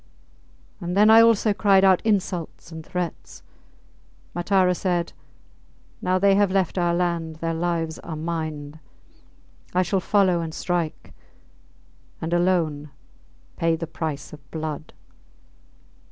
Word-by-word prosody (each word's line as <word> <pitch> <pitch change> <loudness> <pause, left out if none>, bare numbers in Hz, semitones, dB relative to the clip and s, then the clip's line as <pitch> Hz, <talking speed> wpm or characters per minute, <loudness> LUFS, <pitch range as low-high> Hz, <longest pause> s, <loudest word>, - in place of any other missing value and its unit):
And 180 0 -3
then 210 +2 +6
I 225 +1 +9
also 225 -2 +4
cried 195 0 +4
out 190 -2 +5
insults 185 -6 -2
and 160 0 -8
threats. 180 +1 -5 0.9
Matara 180 +1 +2
said, 175 -2 -1 0.9
Now 185 0 +1
they 195 +1 +4
have 200 0 +3
left 190 -1 0
our 175 -1 +1
land 170 -2 -1
their 165 +1 -3
lives 165 -1 -2
are 165 - -7
mind. 155 -2 -5 1.0
I 185 - +4
shall 185 +2 0
follow 185 -2 +2
and 160 -1 -5
strike 175 -3 -3 1.1
and, 165 +1 -3
alone, 170 -5 +1 0.7
pay 165 0 +2
the 165 +1 -4
price 155 -4 -5
of 135 -2 -14
blood. 155 -1 -5
175 Hz, 125 wpm, -24 LUFS, 160-185 Hz, 1.1 s, I